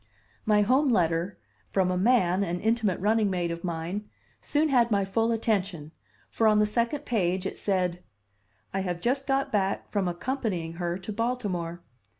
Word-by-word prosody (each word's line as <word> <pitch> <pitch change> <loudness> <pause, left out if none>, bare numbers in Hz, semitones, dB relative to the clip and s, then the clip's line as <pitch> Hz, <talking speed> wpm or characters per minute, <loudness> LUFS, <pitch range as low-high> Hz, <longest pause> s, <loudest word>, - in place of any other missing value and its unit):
My 210 -1 +5
home 265 +6 +3
letter, 175 -3 +1 0.3
from 185 -2 +1
a - - 0
man, 190 -2 +3
an 175 -1 -2
intimate 220 -3 +1
running 215 +1 +2
mate 175 -2 -1
of 170 0 -6
mine, 175 +4 -4 0.3
soon 305 +1 +1
had 240 -4 +4
my 200 -3 +2
full 225 +4 +1
attention, 195 -9 -1 0.4
for 225 - +2
on 215 -1 +5
the 210 - +4
second 235 +7 -1
page 190 -5 0
it - - -3
said: 180 -3 0 0.7
"I 195 - 0
have 180 -2 -2
just 265 +7 0
got 270 0 +1
back 195 -2 -1
from 200 -3 0
accompanying 180 -3 -2
her 175 0 -1
to 195 +3 -6
Baltimore. 200 -8 -2
200 Hz, 165 wpm, -27 LUFS, 180-230 Hz, 0.7 s, My